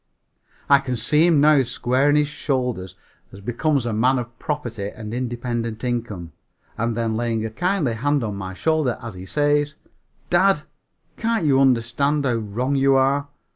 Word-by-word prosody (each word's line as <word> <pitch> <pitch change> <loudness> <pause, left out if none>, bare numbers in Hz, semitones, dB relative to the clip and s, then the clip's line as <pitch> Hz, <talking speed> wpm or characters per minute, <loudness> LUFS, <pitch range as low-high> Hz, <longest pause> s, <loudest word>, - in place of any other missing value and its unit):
I 140 -1 +6
can 130 -2 -3
see 150 +8 +3
him 165 -4 +4
now 150 -1 +5
squaring 130 +3 +1
his 150 0 +3
shoulders, 125 - -2 0.4
as 100 - -11
becomes 125 +5 0
a 120 - -1
man 125 +5 +3
of 120 -1 -6
property 120 -10 -3
and 110 -1 -8
independent 120 -2 -3
income, 115 -9 -3 0.4
and 115 0 -2
then 115 -1 -1
laying 115 -1 -1
a 110 - -4
kindly 175 - 0
hand 145 +4 0
on 105 -3 -3
my 95 -1 -6
shoulder 155 -1 0
as 115 -3 -7
he 95 +1 -9
says, 145 +7 +1 0.6
"Dad, 175 -3 +4 0.5
can't 225 -6 0
you 135 -2 +4
understand 135 +3 +2
how 125 - +2
wrong 115 +5 -2
you 135 0 +4
are? 135 +2 +2
125 Hz, 165 wpm, -22 LUFS, 115-145 Hz, 0.6 s, I